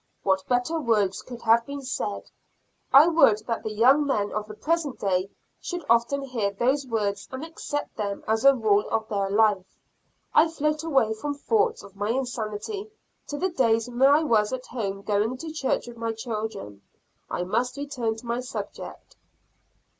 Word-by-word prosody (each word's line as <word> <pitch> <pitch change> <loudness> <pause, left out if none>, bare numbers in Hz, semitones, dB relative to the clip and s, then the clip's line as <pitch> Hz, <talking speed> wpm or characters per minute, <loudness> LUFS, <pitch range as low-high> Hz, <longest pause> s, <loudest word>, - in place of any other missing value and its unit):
What 190 -1 +2
better 250 +7 +1
words 210 -8 +1
could 245 -2 -10
have 230 +1 +5
been 280 0 -6
said; 210 -5 -3 0.7
I 280 +3 +9
would 270 -11 +4
that 230 -1 -2
the 220 - -4
young 255 +7 +5
men 205 -7 0
of 215 0 -3
the 215 - -9
present 310 0 -1
day 190 -1 0 0.3
should 350 -1 -5
often 235 +4 +2
hear 240 -7 -1
those 260 +7 0
words 205 -4 -2
and 260 +4 -5
accept 320 -2 -5
them 200 -2 -3
as 220 +1 +1
a 275 0 +7
rule 210 -4 +2
of 220 -1 -1
their 200 -2 -1
life. 205 -2 +3 0.7
I 320 - +6
float 305 -1 -1
away 270 -9 +2
from 285 +7 -4
thoughts 445 +9 +1
of 200 -1 -14
my 205 +1 -2
insanity 250 - -3 0.4
to 290 - -4
the 375 +5 0
days 230 -8 +2
when 245 +1 -6
I 285 +4 +6
was 215 -7 +2
at 260 -1 -4
home 200 -5 -4
going 215 +5 0
to 320 +3 -7
church 285 -4 -1
with 240 -1 -10
my 230 0 -2
children. 220 - -5 0.5
I 175 - -2
must 240 +8 -1
return 260 -6 -2
to 225 - -12
my 235 +1 -1
subject. 250 0 -7
235 Hz, 175 wpm, -26 LUFS, 210-280 Hz, 0.7 s, I